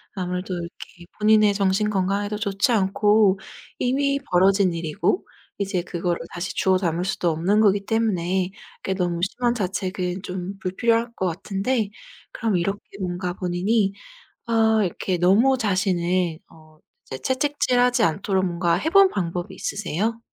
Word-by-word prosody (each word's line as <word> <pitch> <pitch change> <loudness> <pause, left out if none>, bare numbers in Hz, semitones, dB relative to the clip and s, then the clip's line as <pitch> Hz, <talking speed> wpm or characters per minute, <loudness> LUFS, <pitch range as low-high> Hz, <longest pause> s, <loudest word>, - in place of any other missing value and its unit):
아무래도 180 0 -3
이렇게 175 0 -8
본인의 215 -1 +4
정신 200 +1 +1
건강에도 200 +1 -1
좋지 200 +2 0
않고 205 -1 +3 0.4
이미 275 +2 +1
벌어진 190 +1 +4
일이고 165 - -1 0.3
이제 195 -3 -1
그거를 175 0 -2
다시 175 +2 -4
주워 190 -1 +2
담을 175 -2 -1
수도 180 -2 0
없는 180 +7 +2
거기 200 -1 +3
때문에 190 -5 0 0.3
그게 190 - -1
너무 175 -2 -1
심한 240 +5 0
자책은 185 -3 -2
좀 185 +2 -5
불필요할 230 +5 0
것 190 - -2
같은데 200 +6 -1 0.4
그럼 220 -5 0
이렇게 195 +4 -1 0.2
뭔가 180 0 -3
본인이 195 +3 0 0.6
어 220 -1 +3
이렇게 185 0 -1
너무 210 +10 +4
자신을 185 -5 0
어 155 -1 -19 0.4
채찍질하지 255 -2 +2
않도록 190 +3 +1
뭔가 170 -1 +1
해 200 - -1
본 395 +2 +7
방법이 175 - -3
있으세요? 210 +3 -2
195 Hz, 310 characters per minute, -23 LUFS, 180-215 Hz, 0.6 s, 본